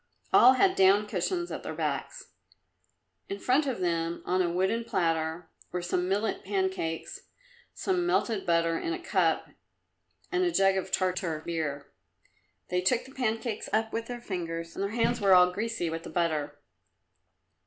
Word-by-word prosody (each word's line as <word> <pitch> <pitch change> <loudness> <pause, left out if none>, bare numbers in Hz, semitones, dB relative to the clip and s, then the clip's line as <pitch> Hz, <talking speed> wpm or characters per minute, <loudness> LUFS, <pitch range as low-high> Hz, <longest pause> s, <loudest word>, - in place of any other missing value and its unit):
All 255 +2 +8
had 375 +8 +3
down 195 +2 +5
cushions 280 - -2
at - - -4
their - - -6
backs. - - -4 1.0
In 395 - -3
front 280 0 +2
of 255 -7 -2
them, 170 -1 -1
on 185 +1 +1
a 175 - +1
wooden 190 +7 0
platter, 165 -4 -1 0.2
were 180 -1 -3
some 180 +1 -1
millet 205 +3 -1
pancakes, 190 -4 -3 0.5
some 365 -2 0
melted 225 - +1
butter 165 -1 +1
in 340 - -2
a 360 - -4
cup 355 - +1 0.8
and 365 0 +1
a 355 - +2
jug 195 - +3
of 190 0 -3
Tartar 180 -5 -1
beer. 145 -4 -3 0.8
They 180 0 +1
took 235 +6 +1
the 265 - -13
pancakes 225 -3 -2
up 220 +1 0
with 225 0 -3
their 245 -1 -6
fingers, 165 -5 -4
and - - -4
their 200 - 0
hands 235 +1 0
were 195 -2 +6
all 180 0 +6
greasy 220 -1 -2
with 165 0 -3
the - - -9
butter. 150 -4 -1
190 Hz, 165 wpm, -28 LUFS, 170-230 Hz, 1.0 s, All